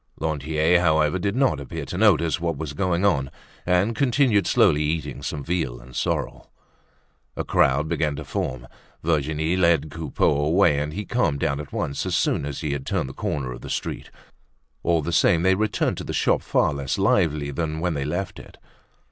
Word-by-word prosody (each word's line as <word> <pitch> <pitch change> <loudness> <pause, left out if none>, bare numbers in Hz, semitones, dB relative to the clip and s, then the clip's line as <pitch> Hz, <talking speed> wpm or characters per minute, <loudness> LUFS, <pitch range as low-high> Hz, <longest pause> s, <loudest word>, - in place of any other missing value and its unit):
Lantier, 80 +2 +1
however, 80 0 +2
did 100 +2 -1
not 135 0 +2
appear 80 - -6
to 70 - -6
notice 85 -5 +3
what 85 -3 -1
was 75 -1 -5
going 90 +3 0
on 70 -9 +2 0.4
and 95 +6 +2
continued 125 -5 +2
slowly 75 - +4
eating 75 -1 -2
some 75 - -4
veal 80 -8 -2
and 65 0 -14
sorrel. - - -3 0.9
A - - -1
crowd 70 +4 +2
began 80 -3 -1
to 75 - -6
form. - - -4 0.4
Virginie 80 +1 0
led 85 -4 +2
Coupeau 80 -2 0
away 80 -1 +3
and 75 +1 -2
he 105 +3 -4
calmed 90 - 0
down 70 0 0
at 75 -2 -8
once 70 - -2
as - - 0
soon 70 - +1
as 70 - -5
he 75 -3 -2
had 70 -2 -4
turned 65 - -2
the - - -8
corner 65 -2 -3
of - - -8
the - - -8
street. - - -4 0.7
All 85 -2 +1
the 85 - -2
same 85 +1 +3
they 95 +1 +4
returned 105 0 0
to - - -5
the - - -5
shop - - +2
far - - +1
less 70 -1 -3
lively 75 -3 +1
than 80 +2 -3
when 90 0 0
they 70 -2 -2
left 85 +6 -3
it. - - -14
80 Hz, 190 wpm, -24 LUFS, 70-90 Hz, 0.9 s, slowly